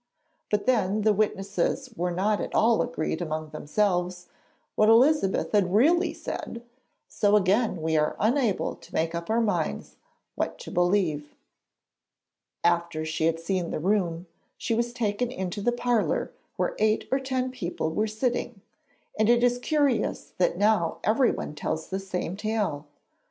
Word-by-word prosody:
But 210 Hz, -1 st, 0 dB
then 215 Hz, -4 st, +1 dB
the 215 Hz, 0 st, +4 dB
witnesses 205 Hz, +5 st, -1 dB
were 180 Hz, -1 st, -1 dB
not 200 Hz, +4 st, 0 dB
at -, -, -5 dB
all 225 Hz, +1 st, +4 dB
agreed 170 Hz, -8 st, -2 dB
among 155 Hz, -2 st, -3 dB
themselves 180 Hz, +2 st, -1 dB, 0.4 s
what 215 Hz, -, +4 dB
Elizabeth 240 Hz, -2 st, +4 dB
had 200 Hz, -3 st, +2 dB
really 340 Hz, -, +4 dB
said, 235 Hz, -, -6 dB, 0.4 s
so 205 Hz, 0 st, +2 dB
again 200 Hz, -2 st, +2 dB
we 160 Hz, 0 st, +1 dB
are 150 Hz, 0 st, +1 dB
unable 230 Hz, -2 st, +1 dB
to -, -, -17 dB
make 165 Hz, +1 st, 0 dB
up 170 Hz, +2 st, -5 dB
our 225 Hz, +1 st, +2 dB
minds 175 Hz, -, -2 dB, 0.4 s
what -, -, -3 dB
to -, -, -8 dB
believe. 175 Hz, -5 st, 0 dB, 1.3 s
After 170 Hz, -2 st, +1 dB
she 160 Hz, 0 st, 0 dB
had 165 Hz, 0 st, 0 dB
seen 175 Hz, 0 st, -2 dB
the -, -, -2 dB
room, 175 Hz, -1 st, 0 dB, 0.3 s
she -, -, -2 dB
was 235 Hz, +1 st, 0 dB
taken 235 Hz, 0 st, -1 dB
into 190 Hz, -3 st, -4 dB
the 240 Hz, -, +2 dB
parlour 240 Hz, -, 0 dB, 0.2 s
where -, -, -1 dB
eight 215 Hz, 0 st, +2 dB
or 265 Hz, -, +2 dB
ten 260 Hz, -1 st, -2 dB
people 175 Hz, -9 st, -3 dB
were 210 Hz, +7 st, 0 dB
sitting, 235 Hz, 0 st, -2 dB, 0.6 s
and 215 Hz, +1 st, +3 dB
it 240 Hz, 0 st, +4 dB
is 245 Hz, 0 st, +3 dB
curious 280 Hz, -4 st, 0 dB
that 175 Hz, -1 st, +2 dB
now 205 Hz, -4 st, +2 dB
everyone 230 Hz, -, +1 dB
tells 155 Hz, +1 st, -4 dB
the 190 Hz, -, -2 dB
same 185 Hz, -2 st, -4 dB
tale. 205 Hz, -9 st, -2 dB
205 Hz, 150 wpm, -26 LUFS, 175-235 Hz, 1.3 s, the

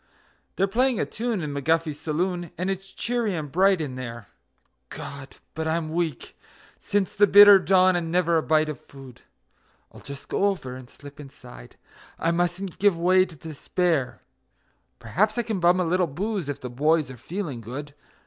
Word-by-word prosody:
They're 195 Hz, -, +2 dB
playing 245 Hz, +5 st, +1 dB
a -, -, +1 dB
tune 225 Hz, -5 st, -3 dB
in 145 Hz, -1 st, -4 dB
McGuffy's 155 Hz, +1 st, 0 dB
saloon, 175 Hz, +2 st, -2 dB
and 185 Hz, +3 st, -1 dB
it's 195 Hz, 0 st, -6 dB
cheery 235 Hz, -5 st, -2 dB
and 150 Hz, -4 st, -5 dB
bright 190 Hz, +2 st, +3 dB
in 145 Hz, -5 st, -4 dB
there 120 Hz, -5 st, -8 dB, 0.6 s
(God! 140 Hz, -1 st, -9 dB, 0.2 s
but 160 Hz, 0 st, -3 dB
I'm 160 Hz, -1 st, -1 dB
weak 165 Hz, -5 st, -3 dB, 0.4 s
since 205 Hz, -2 st, -1 dB
the 205 Hz, +1 st, +5 dB
bitter 205 Hz, 0 st, +9 dB
dawn, 185 Hz, -1 st, +4 dB
and 165 Hz, -2 st, -2 dB
never 170 Hz, -1 st, +2 dB
a -, -, +2 dB
bite 155 Hz, 0 st, +2 dB
of 150 Hz, -5 st, -5 dB
food); 135 Hz, -3 st, -14 dB, 0.7 s
I'll -, -, -14 dB
just 140 Hz, 0 st, -9 dB
go 200 Hz, -, +1 dB
over 155 Hz, -11 st, -3 dB
and 130 Hz, -1 st, -11 dB
slip 145 Hz, +1 st, -14 dB
inside 125 Hz, -, -13 dB, 0.4 s
I 165 Hz, -, 0 dB
mustn't 175 Hz, +2 st, -2 dB
give 200 Hz, -4 st, +3 dB
way 185 Hz, +2 st, +3 dB
to 170 Hz, -, -14 dB
despair 160 Hz, -1 st, -2 dB, 0.7 s
Perhaps 215 Hz, +5 st, 0 dB
I 240 Hz, -, +1 dB
can 220 Hz, -4 st, -3 dB
bum 175 Hz, +1 st, +4 dB
a 180 Hz, -, +1 dB
little 180 Hz, +1 st, +1 dB
booze 185 Hz, +2 st, -3 dB
if 145 Hz, -, -4 dB
the 125 Hz, -, -6 dB
boys 150 Hz, +2 st, +1 dB
are -, -, -9 dB
feeling 155 Hz, -, -5 dB
good. 140 Hz, +6 st, -7 dB
165 Hz, 175 wpm, -25 LUFS, 145-190 Hz, 0.7 s, bitter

